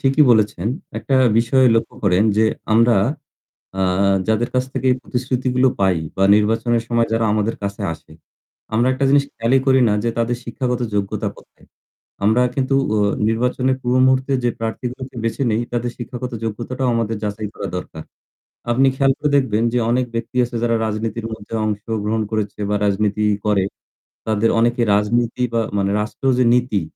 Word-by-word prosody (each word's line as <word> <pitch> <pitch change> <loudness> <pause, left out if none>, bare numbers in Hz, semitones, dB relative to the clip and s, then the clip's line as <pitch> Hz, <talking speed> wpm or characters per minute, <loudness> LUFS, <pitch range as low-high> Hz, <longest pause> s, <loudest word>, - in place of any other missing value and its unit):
ঠিকই 135 +3 +3
বলেছেন। 105 -4 +2 0.3
একটা 135 - -2 0.2
বিষয় 125 +3 +3
লক্ষ্য 115 - -1
করেন 95 0 +3
যে 110 - +4 0.3
আমরা 115 +2 +5 0.9
আ - - +1 0.5
যাদের 110 +2 +1
কাছ 125 - +2
থেকে 130 - -1
প্রতিশ্রুতিগুলো 125 0 0
পাই 95 -3 +2 0.2
বা 95 - +2
নির্বাচনের 115 +2 +1
সময় 115 -1 +1
যারা 115 0 +1
আমাদের 110 +1 0
কাছে 100 0 -4
আসে, 80 - -16 0.6
আমরা 120 +3 +2
একটা 135 +1 0
জিনিস 140 0 +4
খেয়ালই 115 +4 +2
করি 130 0 +5
না - - +2
যে 120 - +1
তাদের 120 +1 0
শিক্ষাগত 125 +1 -2
যোগ্যতা 100 -1 -1
কোথায়। - - -20 0.6
আমরা 110 +4 +4
কিন্তু 135 0 0 0.2
অ - - +2 0.3
নির্বাচনের 125 +3 0
পূর্ব 125 +1 +1
মুহূর্তে 130 +1 +2
যে 120 - +3
প্রার্থীগুলোকে 125 +3 -5
বেছে 115 +4 -2
নেই 110 +2 +1
তাদের 120 0 -1
শিক্ষাগত 125 +1 -6
যোগ্যতাটাও 125 +4 -3
আমাদের 115 -1 -1
যাচাই 105 +1 -3
করা 100 - -5
দরকার। 80 -3 -7 0.7
আপনি 130 +3 +3
খেয়াল 135 0 +3
করে 150 - 0
দেখবেন 115 -5 +1
যে 125 - +2
অনেক 125 +1 +1
ব্যক্তি 115 +2 -4
আছে 120 0 -9
যারা 115 -1 +2
রাজনীতির 110 +1 -3
মধ্যে 110 0 -10
অংশগ্রহণ 105 +1 -2
করেছে 105 -2 -3
বা 105 - +1
রাজনীতি 105 +1 0 0.2
করে। 105 -2 +2 0.6
তাদের 110 +1 +2
অনেকে 120 +1 +2
রাজনীতি 120 +4 0
বা 115 - +2 0.2
মানে 100 0 0
রাষ্ট্র 110 +5 -6
যে - - +5
নীতি 125 -5 0
115 Hz, 160 wpm, -20 LUFS, 105-125 Hz, 0.9 s, আমরা